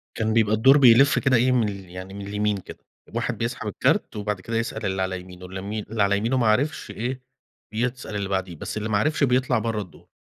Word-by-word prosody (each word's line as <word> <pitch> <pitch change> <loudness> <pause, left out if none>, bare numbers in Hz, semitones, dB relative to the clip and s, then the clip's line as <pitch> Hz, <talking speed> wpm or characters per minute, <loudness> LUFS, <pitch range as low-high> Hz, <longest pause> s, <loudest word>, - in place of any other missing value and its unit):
كان 110 -1 0
بيبقى 110 -2 +3
الدَور 135 +6 +6
بيلِف 130 +1 +6
كده 130 -3 +3
إيه، 130 +2 +3
من 120 -4 +2
ال 95 -3 -8
يعني 95 +2 -8
من 100 0 -7
اليمين 105 0 0
كده، 95 - -10 0.3
الواحد - - -3
بيسحَب - - -3
الكارت، - - 0
وبعد 105 -2 -3
كده 115 +3 -3
يسأَل 115 - -3
اللي 95 0 -1
على 95 0 -2
يمينه، 90 0 -12
اللي 95 +1 -7
م 105 +1 -4
على 100 0 +3
يمينه 115 +5 0
ما 120 - +2
عرَفش 135 +9 0
إيه، 125 +3 -4 0.5
يسأَل 120 -1 -3
اللي 100 -1 -2
بعدِيه، 95 -3 -2
بس 95 - -6
اللي 110 +1 -3
ما 105 - +2
عرَفش 150 +6 +1
بيطلَع 130 -2 +2
برّه 110 -2 -2
الدَور. 90 -4 -13
110 Hz, 225 wpm, -24 LUFS, 100-120 Hz, 0.5 s, الدَور